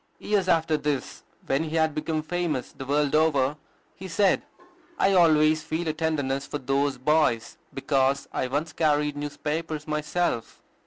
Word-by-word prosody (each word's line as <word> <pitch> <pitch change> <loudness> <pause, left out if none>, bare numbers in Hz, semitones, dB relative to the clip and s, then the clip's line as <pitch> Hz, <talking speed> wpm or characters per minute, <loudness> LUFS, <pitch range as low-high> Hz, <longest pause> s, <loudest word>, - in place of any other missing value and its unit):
Years 205 -3 0
after 160 -3 +2
this, 140 -2 -3 0.2
when 135 +4 +1
he 160 +1 -4
had 160 -1 +2
become 155 +1 -2
famous 160 -4 -2
the 135 - -9
world 145 0 +1
over, 150 -3 +3 0.4
he 190 - -8
said, 190 +2 +2 0.6
"I 195 - +3
always 155 -3 +4
feel 160 +2 -3
a 155 - 0
tenderness 145 -4 -1
for - - -3
those 135 0 0
boys, 130 -4 +1
because 135 0 0
I 130 - -1
once 150 +5 -2
carried 150 -2 +1
newspapers 150 +1 -4
myself." 150 -3 -2
150 Hz, 150 wpm, -26 LUFS, 140-160 Hz, 0.6 s, always